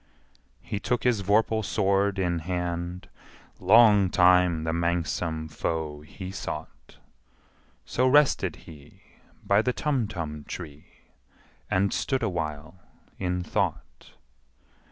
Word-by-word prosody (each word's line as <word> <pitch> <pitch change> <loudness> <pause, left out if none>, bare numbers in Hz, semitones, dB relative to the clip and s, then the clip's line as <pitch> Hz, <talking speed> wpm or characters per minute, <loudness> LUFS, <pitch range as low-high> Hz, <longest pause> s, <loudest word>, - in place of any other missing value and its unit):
He 100 - -4
took 120 +3 -1
his 120 -5 +2
vorpal 110 +2 +2
sword 100 0 +1
in 90 -3 0
hand: 90 +1 -4 0.5
Long 105 0 +6
time 90 -2 +4
the 80 0 -1
manxome 85 -1 -1
foe 75 -1 -3
he 95 +5 -9
sought - - -8 0.9
So 130 +1 +1
rested 145 +2 +3
he 75 -2 -15 0.4
by 100 +1 +4
the 125 +2 0
Tumtum 100 - -3
tree, 75 -4 -10 0.7
And 100 +1 +1
stood 130 -3 -1
awhile 80 -3 -4 0.4
in 90 -1 -1
thought. - - -3
90 Hz, 105 wpm, -26 LUFS, 80-105 Hz, 0.9 s, Long